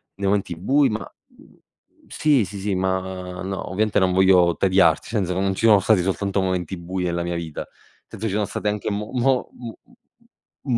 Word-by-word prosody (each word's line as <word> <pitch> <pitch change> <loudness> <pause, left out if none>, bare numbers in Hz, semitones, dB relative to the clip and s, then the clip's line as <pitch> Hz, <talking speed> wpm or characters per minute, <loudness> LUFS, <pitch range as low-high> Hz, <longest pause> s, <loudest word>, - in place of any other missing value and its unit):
nei 100 0 -3
momenti 95 -3 0
bui, 135 - +2
ma 110 +1 -2 0.3
mhmm, - - -21 0.5
sì, 145 -7 +2
sì, 100 +2 -8
sì, 100 0 -2
ma 95 -1 -3
no, 95 -1 -5
ovviamente 105 +1 +1
non 95 -1 +2
voglio 90 -2 +4
tediarti, 95 0 +3
senza 100 -5 -1
non 95 +1 0
ci 115 - -1
sono 105 -3 +7
stati 105 -1 +3
soltanto 100 +1 -1
momenti 95 -1 -2
bui 90 +1 -4
nella 85 0 -1
mia 85 0 -3
vita, 80 -3 -5 0.4
senso 110 - -5
ci 100 - -3
sono 105 0 0
stati 105 - -4
anche 105 +1 -2
mo 105 +1 -4
mo 130 +1 +1
m 120 -2 -8 1.0
m - - +3
95 Hz, 190 wpm, -22 LUFS, 90-105 Hz, 1.0 s, sono